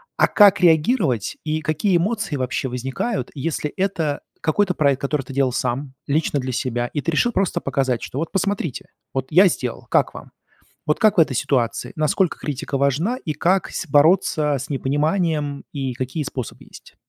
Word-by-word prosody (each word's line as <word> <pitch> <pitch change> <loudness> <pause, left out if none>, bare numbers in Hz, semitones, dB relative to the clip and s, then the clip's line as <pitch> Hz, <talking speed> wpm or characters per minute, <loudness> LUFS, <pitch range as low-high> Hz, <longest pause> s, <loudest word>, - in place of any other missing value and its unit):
А - - +4
как 205 -2 +5
реагировать, 160 - +2
и 155 0 -1
какие 155 +5 +1
эмоции 205 -1 -1
вообще 130 0 -2
возникают, 135 - -3
если 150 +1 -2
это 180 -7 -1 0.2
какой-то 180 +4 +1
проект, 140 -3 +2
который 140 0 -1
ты 135 - -10
делал 135 -1 +2
сам 130 +2 -2
лично 145 0 +1
для 130 0 -3
себя, 120 0 -1
и 145 - -1
ты 165 - -1
решил 240 +10 +2
просто 195 -4 0
показать, 130 -4 -1
что 135 - -5
вот 165 - -3
посмотрите, 195 -7 -2 0.2
вот 130 -1 -2
я 185 +5 +7
сделал, 125 -7 -4
как - - +2
вам? - - -11 0.6
Вот 150 - +1
как 215 -1 +4
в - - +9
этой 145 -5 +3
ситуации? 120 +3 0
Насколько 155 +3 +1
критика 140 -1 -3
важна, 145 - +1
и 155 - -1
как 180 +5 +1
с - - -4
бороться 150 -1 +3
с 130 - -7
непониманием 145 +1 0
и 135 -3 -3
какие 130 +5 -3
способы 130 -3 -6
есть? - - -15
150 Hz, 175 wpm, -21 LUFS, 135-175 Hz, 0.6 s, в